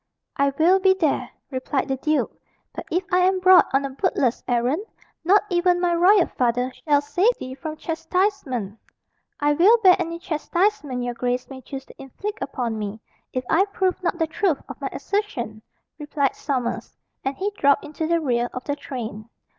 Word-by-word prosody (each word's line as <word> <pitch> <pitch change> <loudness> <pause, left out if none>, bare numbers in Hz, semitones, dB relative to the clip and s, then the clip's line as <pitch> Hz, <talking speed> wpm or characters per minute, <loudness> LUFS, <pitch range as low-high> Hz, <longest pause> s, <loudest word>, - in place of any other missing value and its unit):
"I 280 0 +2
will 355 +4 +5
be 380 0 +4
there," 320 -7 0 0.2
replied 260 +1 -2
the 270 - 0
duke; 305 +3 0 0.4
"but - - -7
if 355 +3 0
I 365 - +4
am 375 +1 +3
brought 370 0 +7
on 270 +1 +2
a 275 - -4
bootless 265 -5 0
errand, 245 - +1 0.4
not 390 +5 +5
even 355 0 +3
my 350 -1 +1
royal 360 +2 +5
father 250 +1 -1
shall 290 -2 +1
save 365 +11 +1
thee 255 - -7
from 310 +3 -6
chastisement." 320 - -2 0.6
"I 295 0 +3
will 380 +10 +6
bear 365 -2 +8
any 335 -1 -3
chastisement 335 -4 -1
your 245 0 -2
grace 250 +2 -2
may 260 -1 -8
choose 270 +1 -8
to - - -14
inflict 395 - -6
upon 235 -5 -3
me, 210 +1 -5 0.3
if 255 - -2
I 375 +5 +3
prove 380 -2 -1
not 345 -1 -1
the 325 - +1
truth 320 -1 0
of - - -10
my - - -2
assertion," 245 - -3 0.4
replied 290 -2 -1
Sommers. 260 -5 -3 0.3
And 270 +1 -2
he 400 +2 -1
dropped 280 -6 +3
into 310 +1 -4
the 335 0 +2
rear 245 -5 0
of 255 - -5
the 285 - -2
train. 230 -6 -7
300 Hz, 180 wpm, -23 LUFS, 255-365 Hz, 0.6 s, bear